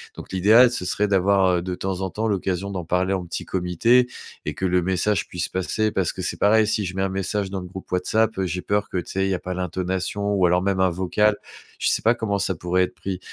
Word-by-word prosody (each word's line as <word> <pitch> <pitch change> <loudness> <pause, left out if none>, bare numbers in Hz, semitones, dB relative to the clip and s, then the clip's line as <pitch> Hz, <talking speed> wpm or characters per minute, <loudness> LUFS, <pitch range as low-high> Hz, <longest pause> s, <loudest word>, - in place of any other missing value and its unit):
Donc - - -10
l'idéal, 110 +7 +6
ce 105 -7 -3
serait 105 +3 0
d'avoir, 95 -1 +3
heu, - - -1
de 90 +1 -4
temps 95 0 -3
en 95 0 -2
temps 110 +4 -2
l'occasion 95 -1 -2
d'en 90 -3 -4
parler 90 +3 +1
en 95 -2 -2
petit 85 - -5
comité. 95 +8 +2 0.4
Et - - -2
que - - -9
le 90 0 +2
message 95 +3 0
puisse 90 -3 -4
passer 105 +4 -1
parce 95 -5 0
que 95 - -6
c'est 90 - -3
pareil, 110 +2 +4
si 105 -1 0
je 90 0 -5
mets 95 - -1
un 95 - 0
message 95 +1 -2
dans 95 0 -4
le 90 - -7
groupe 95 +1 -10
Whatsapp, 110 +4 +1
heu, 95 - 0
j'ai 90 +1 -3
peur 105 +1 0
que, - - -3
tu 90 - -4
sais, 95 0 0
il - - 0
y - - +2
a 90 - -1
pas 90 - -5
l'intonation 95 +3 -2
ou 95 -2 +3
alors 90 +1 +3
même 95 0 0
un 95 0 +4
vocal. 95 +4 +1 0.4
Je - - 0
sais - - +1
pas 115 - +5
comment 105 -4 -1
ça 95 - 0
pourrait 90 +2 +1
être 90 - -3
pris. 95 -2 -5
95 Hz, 265 wpm, -23 LUFS, 90-100 Hz, 0.4 s, l'idéal